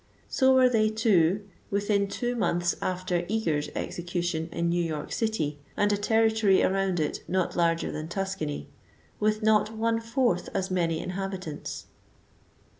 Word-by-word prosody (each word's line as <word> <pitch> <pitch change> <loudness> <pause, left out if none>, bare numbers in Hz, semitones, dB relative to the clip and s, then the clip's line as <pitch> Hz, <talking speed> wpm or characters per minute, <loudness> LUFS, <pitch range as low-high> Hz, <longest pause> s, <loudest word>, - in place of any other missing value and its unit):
So 265 0 +4
were 260 -1 +6
they, 220 -3 +3
too, 205 -3 +2 0.2
within 200 0 +1
two 240 +4 -2
months 175 -6 +1
after 180 -1 -1
Eager's 160 -9 0
execution, 175 -2 -3
in 170 0 -1
New 175 +1 +1
York 155 -3 -4
city 160 -11 -1 0.2
and 205 0 +3
a - - +3
territory 220 -1 +3
around 190 -2 +1
it 150 -1 -2
not 185 -1 0
larger 165 -1 +1
than 155 +1 -5
Tuscany, 170 - -3 0.5
with 215 +1 +1
not 220 0 +3
one 225 +1 +1
fourth 230 -5 0
as 190 0 -1
many 170 -3 +1
inhabit 190 0 -4
ants. 150 -1 -6
190 Hz, 145 wpm, -27 LUFS, 170-220 Hz, 0.5 s, were